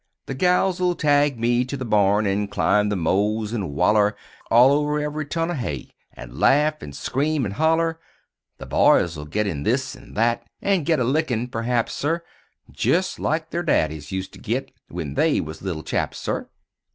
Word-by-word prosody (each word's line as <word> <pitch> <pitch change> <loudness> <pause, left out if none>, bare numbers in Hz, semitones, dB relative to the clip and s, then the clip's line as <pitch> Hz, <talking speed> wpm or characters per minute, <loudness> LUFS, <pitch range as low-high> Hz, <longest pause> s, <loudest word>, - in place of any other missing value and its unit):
The - - -5
gals 180 +4 +2
'll 180 -1 +2
tag 145 -4 +2
me 120 +1 +2
to 130 +2 -5
the 130 - -5
barn; 105 -1 +3
An' 100 +1 0
climb 105 0 +2
the 105 - 0
mows, 105 +5 0
an' 95 -11 -3
waller 105 +4 +3 0.3
All 125 +4 +6
over 150 +1 +1
ev'ry 150 0 -3
ton 165 +3 -1
o' - - -1
hay 100 - -4 0.2
An' - - -10
laugh 150 +2 +3
an' 70 - -8
scream 145 - -1
an' 100 - -3
holler. 160 +6 +1 0.6
The - - -9
boys 85 -1 +3
'll 75 -1 -7
git 105 +8 -1
in 80 -8 -3
this - - -1
an' - - -15
that; 115 +2 +2 0.2
An' 195 -6 +1
git 160 -1 +2
a - - +2
lickin' 125 -3 0
p'r'aps, 115 0 -1
sir 165 +4 -1 0.5
Jest 185 +2 0
like 160 +1 -1
the'r 170 - -1
daddies 80 - 0
used 95 0 -4
to - - -12
git - - -3 0.2
When 80 -5 -5
they - - +2
was 80 0 -6
little 85 -5 -4
chaps, - - -2
sir. - - -3
120 Hz, 190 wpm, -23 LUFS, 100-155 Hz, 0.6 s, All